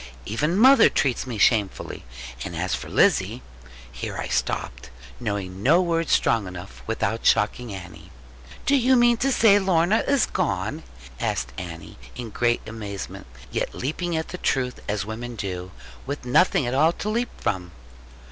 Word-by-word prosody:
Even 150 - 0
mother 260 +2 +7
treats 130 -1 0
me 120 -3 -4
shamefully. 105 -2 +1 0.4
And - - -6
as - - -2
for - - -4
Lizzie - - +2 0.3
' 60 0 -18
Here - - -4
I - - -4
stopped, - - -2 0.3
knowing 95 -2 -4
no 155 - +5
words 165 -2 0
strong 115 -4 +2
enough, 90 +1 -9
without 115 0 -1
shocking 115 +2 +2
Annie. 95 -3 -9 0.6
'Do 280 - +4
you 260 +1 +4
mean 240 -1 +5
to 270 +4 +1
say 215 -5 +5
that - - -3
Lorna 185 +3 +3
is 280 -4 +3
gone?' - - -2 0.4
asked 60 +1 -2
Annie, 85 -1 -8 0.2
in 120 -3 -6
great 120 +2 +1
amazement; 105 - -7 0.2
yet - - -2
leaping 160 +5 -2
at 160 - -3
the 180 - -6
truth, 125 -2 0
as 105 -1 -1
women 120 +3 -6
do, 90 -3 -5 0.4
with 140 -1 -5
nothing 135 +2 +3
at 120 - -2
all 155 +5 +4
to 205 - -6
leap 235 +3 0
from. 90 -3 -2
120 Hz, 165 wpm, -24 LUFS, -, 0.6 s, mother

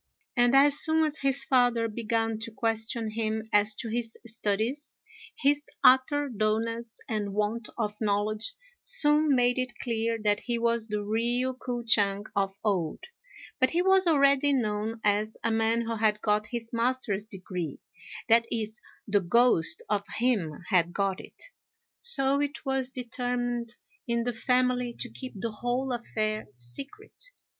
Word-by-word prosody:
And 245 0 +3
as 285 +1 +6
soon 315 0 +4
as 305 0 -1
his 275 0 +2
father 245 -3 +2
began 225 0 -1
to 230 +1 -6
question 225 -1 -1
him 220 0 -2
as 210 +1 +4
to 235 - -6
his 230 0 -3
studies, 225 +6 -2 0.4
his 290 0 +1
utter 265 +3 +4
dulness 225 0 -2
and 205 -3 -3
want 210 +2 -2
of 215 -3 -2
knowledge 215 - -1 0.3
soon 300 - +4
made 245 0 +2
it 250 -1 -3
clear 230 -1 -1
that 205 -1 +2
he 240 -1 -2
was 230 -1 +1
the 210 -1 -3
real 240 +4 0
K'o 245 -1 -5
ch'ang 205 -3 +2
of 195 -1 0
old; 185 -7 -1 0.6
but 260 - +3
he 345 +4 +1
was 380 -1 +4
already 280 -2 +4
known 220 -2 -1
as 210 +1 0
a 230 - +1
man 225 +1 +1
who 230 -1 -3
had 215 -1 +1
got 210 0 0
his 230 0 -5
master's 230 -3 -1
degree, 180 -6 -6 0.5
(that 230 +1 +5
is, 220 -1 -3 0.3
the 205 -1 +2
ghost 190 -2 +3
of 205 -1 0 0.2
him 200 - -1
had 175 -3 +2
got 195 -2 -1
it,) - - -12 0.6
so 280 - +5
it 290 +1 -4
was 265 -1 0
determined 245 -2 -3 0.3
in 235 0 0
the 245 0 -2
family 250 0 0
to 245 - -5
keep 255 -1 -8
the 230 +2 -3
whole 245 +4 -2
affair 215 -2 -3
secret. 275 - -7
230 Hz, 150 wpm, -27 LUFS, 215-255 Hz, 0.6 s, as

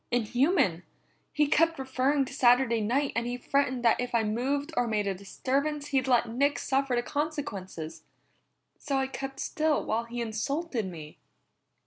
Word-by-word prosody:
"Inhuman! 245 - +2 0.5
He 300 - +2
kept 330 +3 +3
referring 265 +1 +1
to 260 - -9
Saturday 245 -3 +4
night, 265 +7 0
and 235 +1 0
he 245 0 -3
threatened 255 -1 0
that 230 - +4
if 245 -1 -3
I 230 - +3
moved 275 +8 -1
or 245 -1 +1
made 210 -2 0
a 195 - 0
disturbance 280 +9 -2
he'd 265 -2 +1
let 245 -2 +3
Nick 280 +5 +1
suffer 270 -1 0
the 240 - 0
consequences. 200 - -4 0.8
So 275 - -1
I 265 - +1
kept 270 0 -6
still 310 -1 0
while 230 +2 -1
he 240 +1 -6
insulted 235 - -2
me." 155 -4 -9
255 Hz, 160 wpm, -28 LUFS, 230-280 Hz, 0.8 s, Saturday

